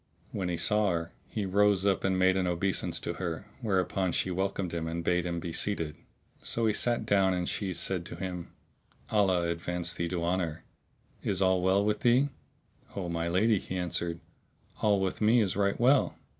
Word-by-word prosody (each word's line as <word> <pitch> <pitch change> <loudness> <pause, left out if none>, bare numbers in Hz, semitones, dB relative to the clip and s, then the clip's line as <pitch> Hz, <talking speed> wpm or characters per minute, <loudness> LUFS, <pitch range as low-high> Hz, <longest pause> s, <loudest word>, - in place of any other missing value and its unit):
When 95 -3 -2
he 85 - -1
saw 105 +1 +3
her, 85 -2 -2 0.2
he 105 - -3
rose 100 0 +3
up 100 -2 +2
and 95 -1 +1
made 95 0 +4
an 95 -1 +1
obeisance 90 +2 +1
to - - -3
her, 85 -3 -3 0.2
whereupon 95 -4 0
she 95 - 0
welcomed 95 -1 -2
him 80 -1 -2
and 85 +1 -3
bade 90 0 +1
him 85 -1 -2
be 85 0 -5
seated. 80 -7 -1 0.5
So 115 - -1
he 110 - +3
sat 120 -1 0
down 95 -3 +3
and 90 -1 -2
she 100 -3 -2
said 90 0 -2
to - - -7
him, 90 -3 -5 0.6
"Allah 95 -5 +3
advance 85 +1 -1
thee 85 0 -2
to 85 -1 -2
honour! 85 -2 -1 0.6
Is 95 -3 -1
all 95 -1 +3
well 95 +2 +3
with 105 0 +1
thee?" 125 +4 +3 0.7
"O 90 -3 -3
my 85 0 -2
lady," 100 +5 +3
he 95 - -5
answered, 85 -1 -1 0.6
"all 105 -2 +3
with 95 +2 -2
me 110 +3 +5
is 100 -4 +1
right 100 0 +1
well." 130 +3 +3
95 Hz, 190 wpm, -29 LUFS, 85-100 Hz, 0.7 s, me